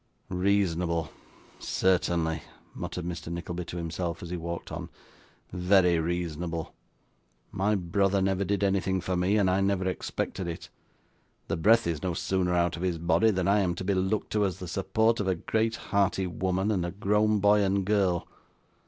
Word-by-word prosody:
'Reasonable, 90 Hz, -4 st, 0 dB, 0.5 s
certainly!' 85 Hz, -4 st, +1 dB, 0.3 s
muttered 90 Hz, -, -5 dB
Mr. 85 Hz, -1 st, -5 dB
Nickleby 85 Hz, 0 st, -4 dB
to 90 Hz, -, -6 dB
himself, 85 Hz, 0 st, -3 dB
as 85 Hz, -, -7 dB
he -, -, -2 dB
walked 85 Hz, 0 st, -5 dB
on, -, -, -5 dB, 0.6 s
'very 90 Hz, -1 st, +4 dB
reasonable! 85 Hz, 0 st, -3 dB, 0.8 s
My 105 Hz, +3 st, +1 dB
brother 95 Hz, +2 st, +1 dB
never 95 Hz, 0 st, +1 dB
did 100 Hz, +1 st, -1 dB
anything 95 Hz, -1 st, +1 dB
for 90 Hz, +1 st, -2 dB
me, 90 Hz, +4 st, +2 dB
and 100 Hz, -3 st, +3 dB
I 95 Hz, +1 st, +2 dB
never 95 Hz, -1 st, +1 dB
expected 95 Hz, +1 st, -3 dB
it; 85 Hz, -, -6 dB, 0.8 s
the -, -, +1 dB
breath 115 Hz, +8 st, +4 dB
is 85 Hz, -3 st, -2 dB
no 90 Hz, -3 st, -2 dB
sooner 90 Hz, 0 st, 0 dB
out 85 Hz, -1 st, +2 dB
of -, -, -7 dB
his 90 Hz, -2 st, 0 dB
body 85 Hz, +5 st, +3 dB
than 95 Hz, -3 st, 0 dB
I 100 Hz, +1 st, +4 dB
am 90 Hz, -3 st, 0 dB
to 95 Hz, -, -5 dB
be 100 Hz, +2 st, +1 dB
looked 95 Hz, +3 st, -1 dB
to, 105 Hz, -1 st, +2 dB
as 95 Hz, -3 st, -1 dB
the 90 Hz, -, -7 dB
support 110 Hz, +6 st, +1 dB
of 105 Hz, -, -1 dB
a 95 Hz, -, +2 dB
great 110 Hz, +6 st, 0 dB, 0.2 s
hearty 100 Hz, -1 st, +2 dB
woman, 95 Hz, +3 st, -1 dB
and 95 Hz, -4 st, 0 dB
a 85 Hz, -, -2 dB
grown 105 Hz, +3 st, +2 dB
boy 105 Hz, +1 st, +4 dB
and 100 Hz, 0 st, +1 dB
girl. 95 Hz, -4 st, +1 dB
95 Hz, 175 wpm, -28 LUFS, 85-100 Hz, 0.8 s, very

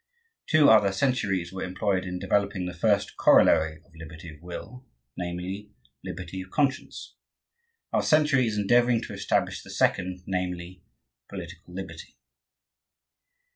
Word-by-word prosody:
Two 155 Hz, -3 st, +5 dB
other 105 Hz, -3 st, +6 dB
centuries 95 Hz, -6 st, 0 dB
were 95 Hz, -, -5 dB
employed 95 Hz, +1 st, -1 dB
in 90 Hz, 0 st, -4 dB
developing 100 Hz, 0 st, 0 dB
the 90 Hz, -, -4 dB
first 100 Hz, +3 st, +1 dB
corollary 80 Hz, 0 st, +4 dB
of 85 Hz, -, -27 dB
liberty 80 Hz, +1 st, -10 dB
of 75 Hz, -, -17 dB
will, 105 Hz, +8 st, -9 dB, 0.3 s
namely, 90 Hz, +3 st, -5 dB, 0.3 s
liberty 90 Hz, +1 st, -6 dB
of 95 Hz, -, -11 dB
conscience. 140 Hz, 0 st, -1 dB, 0.8 s
Our -, -, +3 dB
century 150 Hz, -5 st, +3 dB
is 105 Hz, -1 st, -2 dB
endeavoring 120 Hz, +3 st, +3 dB
to 105 Hz, -, -7 dB
establish 100 Hz, +1 st, -1 dB
the -, -, -14 dB
second, 90 Hz, 0 st, 0 dB
namely, 90 Hz, -1 st, -4 dB, 0.5 s
political 90 Hz, -1 st, -9 dB
liberty. 90 Hz, -4 st, -8 dB
95 Hz, 130 wpm, -27 LUFS, 90-105 Hz, 0.8 s, other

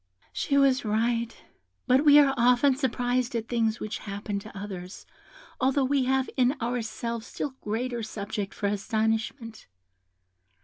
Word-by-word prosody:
"She 280 Hz, -, 0 dB
was 270 Hz, -2 st, +4 dB
right; 230 Hz, +2 st, 0 dB, 0.5 s
but 260 Hz, +3 st, +4 dB
we 295 Hz, -1 st, +8 dB
are 280 Hz, -2 st, +6 dB
often 250 Hz, +2 st, +4 dB
surprised 250 Hz, -2 st, -1 dB
at 225 Hz, -1 st, -2 dB
things 230 Hz, -2 st, 0 dB
which 215 Hz, -, -4 dB
happen 200 Hz, 0 st, -4 dB
to 200 Hz, 0 st, -11 dB
others, 190 Hz, -2 st, -7 dB, 0.5 s
although 265 Hz, +1 st, +2 dB
we 270 Hz, -1 st, +1 dB
have 265 Hz, 0 st, +1 dB
in 255 Hz, 0 st, +3 dB
ourselves 235 Hz, -1 st, -3 dB
still 290 Hz, -, -4 dB
greater 235 Hz, +3 st, -2 dB
subject 205 Hz, -2 st, -4 dB
for 205 Hz, -, -4 dB
astonishment. 220 Hz, +3 st, -2 dB
235 Hz, 135 wpm, -27 LUFS, 215-255 Hz, 0.5 s, we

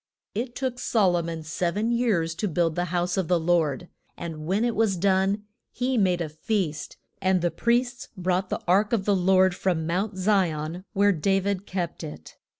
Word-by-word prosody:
It 240 Hz, +3 st, -3 dB
took 255 Hz, -2 st, -3 dB
Sol 205 Hz, -8 st, +2 dB
o 175 Hz, -, +1 dB
mon 165 Hz, -1 st, -5 dB
sev 170 Hz, +3 st, -2 dB
en 225 Hz, +3 st, +1 dB
years 210 Hz, -9 st, +1 dB
to 195 Hz, +5 st, -2 dB
build 170 Hz, -2 st, +1 dB
the 175 Hz, +2 st, -1 dB
house 175 Hz, +1 st, -1 dB
of 190 Hz, -4 st, 0 dB
the 175 Hz, 0 st, +3 dB
Lord; 165 Hz, -2 st, +1 dB, 0.3 s
and 160 Hz, -2 st, -6 dB
when 200 Hz, +6 st, +1 dB
it 235 Hz, -, 0 dB
was 215 Hz, -4 st, +2 dB
done 195 Hz, +2 st, +2 dB, 0.3 s
he 255 Hz, +1 st, -1 dB
made 185 Hz, -5 st, +2 dB
a 160 Hz, -, -2 dB
feast, 160 Hz, -1 st, -2 dB, 0.2 s
and 185 Hz, -1 st, +2 dB
the 175 Hz, -, +2 dB
priests 240 Hz, -, 0 dB
brought 185 Hz, +1 st, 0 dB
the -, -, -2 dB
ark 200 Hz, +5 st, +3 dB
of 200 Hz, -4 st, +1 dB
the 205 Hz, -, +3 dB
Lord 185 Hz, 0 st, +4 dB
from 175 Hz, -4 st, 0 dB
Mount 190 Hz, +4 st, -1 dB
Zi 190 Hz, -1 st, +3 dB
on 155 Hz, +4 st, -5 dB
where 205 Hz, 0 st, +4 dB
Da 195 Hz, +3 st, +1 dB
vid 200 Hz, 0 st, -2 dB
kept 180 Hz, -3 st, -3 dB
it. 75 Hz, +1 st, -9 dB
185 Hz, 200 wpm, -26 LUFS, 170-205 Hz, 0.3 s, Lord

